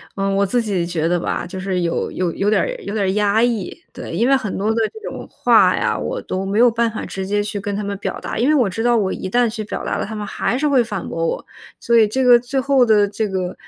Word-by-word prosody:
呃， 195 0 -1
我 200 +1 +2
自 235 +5 +1
己 195 -6 -1
觉 170 -2 -2
得 175 +1 +1
吧， 175 - -2
就 185 +1 -7
是 185 -1 -2
有 170 -1 -1
有 180 -2 -1
有 200 +4 -1
点 215 - +3
儿 - - -1 0.2
有 - - -4
点 205 -3 0
儿 - - +1
压 210 +2 +2
抑。 230 -6 -1
对， - - -8
因 235 - +2
为 - - +5
很 215 -6 -4
多 210 +3 0
的 - - -4 0.2
这 440 - -11
种 - - -8
话 - - +4
呀， - - 0
我 - - -3
都 190 +1 -4
没 200 +3 0
有 240 0 +6
办 230 0 +1
法 220 - -6
直 190 0 -5
接 205 +1 0
去 210 0 -4
跟 200 0 -4
他 210 - -3
们 200 0 -3
表 - - -5
达。 - - -5
因 240 - +1
为 305 - +4
我 245 -8 +3
知 210 +4 -4
道 240 0 +3
我 200 -4 +1
一 190 - -5
旦 240 +2 +2
去 215 -1 -5
表 - - -5
达 - - -2
了， - - -2
他 220 - -7
们 210 -1 -4
还 230 +4 -2
是 295 - -1
会 265 -3 +4
反 210 -5 -4
驳 165 0 -1
我。 - - -3 0.3
所 235 0 +2
以 220 -2 +6
这 260 +5 -1
个 245 -1 +7
最 250 +3 -5
后 265 -1 +3
的 210 -3 +4
这 210 +2 -2
个 185 -2 -3
210 Hz, 315 characters per minute, -19 LUFS, 195-235 Hz, 0.3 s, 个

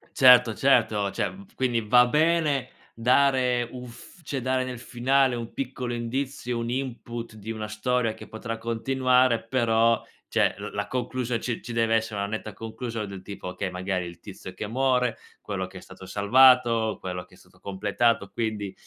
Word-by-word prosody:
Certo, 125 -4 +7
certo, 110 -5 +2
cioè, 95 - -1
mhmm, 195 +2 -12
f 230 - -27
quindi 120 - +1
va 125 +3 +5
bene 155 -1 +2 0.2
dare 125 0 +2
un 125 -1 -8
f 115 - -13
cioè 140 -3 -3
dare 130 +1 0
nel 130 -1 -5
finale 130 +2 +2
un 115 -1 -6
piccolo 130 -2 -4
indizio, 125 +1 -3
un 115 0 -3
input 120 -2 -4
di 110 0 -10
una 110 -1 -5
storia 115 +2 0
che 110 - -12
potrà 115 +1 -5
continuare, 125 +1 +2
però, 115 -1 +2 0.3
cioè, - - +2
l - - -5
la - - -2
conclusio 125 -1 -2
ci 120 0 -3
ci 120 - -6
deve 115 -1 +2
essere 110 -2 -1
una 100 - -1
netta 110 -1 -5
conclusion 115 +1 -5
del 100 -1 -8
tipo: 100 -1 -8
okay, 90 +1 -4
magari 90 0 -2
il 85 0 -10
tizio 95 -2 -10
che 105 +3 -5
muore, 125 0 +1 0.2
quello 100 -3 -3
che 95 0 -10
è - - -15
stato 95 0 -12
salvato, 115 +2 +4
quello 90 -1 -5
che - - -25
è - - -17
stato - - -22
completato, 100 +2 0
quindi, 105 -4 -3
115 Hz, 180 wpm, -26 LUFS, 105-125 Hz, 0.3 s, Certo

